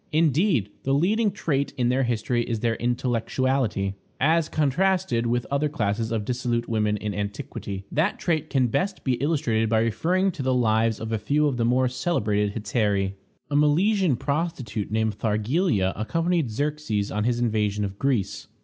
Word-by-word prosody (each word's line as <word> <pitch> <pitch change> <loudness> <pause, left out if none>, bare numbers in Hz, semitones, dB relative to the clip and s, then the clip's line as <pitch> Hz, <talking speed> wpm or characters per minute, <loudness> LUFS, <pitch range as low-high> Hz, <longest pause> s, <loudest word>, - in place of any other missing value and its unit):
Indeed, 155 - +2
the 135 +1 +1
leading 210 +9 +2
trait 140 -8 -1
in 120 -1 +2
their 130 +2 +2
history 120 0 0
is 115 -2 -3
their 115 -1 +1
intellectuality, 120 -3 0 0.3
as 160 +3 +2
contrasted 155 -4 +1
with 120 +1 0
other 145 +2 +1
classes 110 -4 -1
of 110 -3 -1
dissolute 120 -1 -1
women 105 -2 +1
in 105 0 -4
antiquity. 100 -1 -5
That 160 +7 +1
trait 160 -3 -1
can 130 -2 +2
be 120 - -2
best 195 - 0
illustrated 125 -4 +1
by 110 0 +3
referring 180 - +1
to 160 - -6
the 130 -1 +1
lives 110 -2 +2
of 110 0 -5
a 110 - 0
few 150 +6 +1
of 140 -4 0
the 115 - +1
more 125 +2 +3
celebrated 105 -7 0
hetairæ. 105 -3 0 0.4
A - - 0
Milesian 165 - +3
prostitute, 140 - -2
named 110 -1 -1
Thargelia, 110 - +1
accompanied 165 - 0
Xerxes 130 -4 -2
on 105 - -1
his 120 0 +1
invasion 105 -3 0
of 100 0 -7
Greece. 120 -8 -1
120 Hz, 165 wpm, -25 LUFS, 110-150 Hz, 0.4 s, by